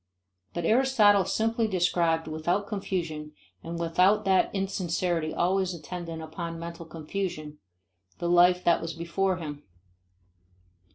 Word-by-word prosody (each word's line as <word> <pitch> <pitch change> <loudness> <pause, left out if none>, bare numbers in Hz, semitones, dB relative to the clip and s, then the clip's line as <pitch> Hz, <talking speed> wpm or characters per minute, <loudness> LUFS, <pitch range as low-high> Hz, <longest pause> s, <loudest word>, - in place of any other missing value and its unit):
But 170 -1 -2
Aristotle 215 -4 +4
simply 225 0 0
described 170 -4 +1
without 165 +6 -1
confusion 170 -7 -4 0.3
and 170 +1 -6
without 180 +5 +3
that 190 -1 +3
insincerity 175 -4 -1
always 185 0 0
attendant 165 0 -6
upon 165 +1 -6
mental 170 0 -7
confusion, 155 -2 -5 0.6
the 170 - -3
life 180 +1 +5
that 170 - +3
was 165 0 -4
before 180 +3 -1
him. 150 -4 -6
175 Hz, 115 wpm, -27 LUFS, 165-195 Hz, 0.6 s, life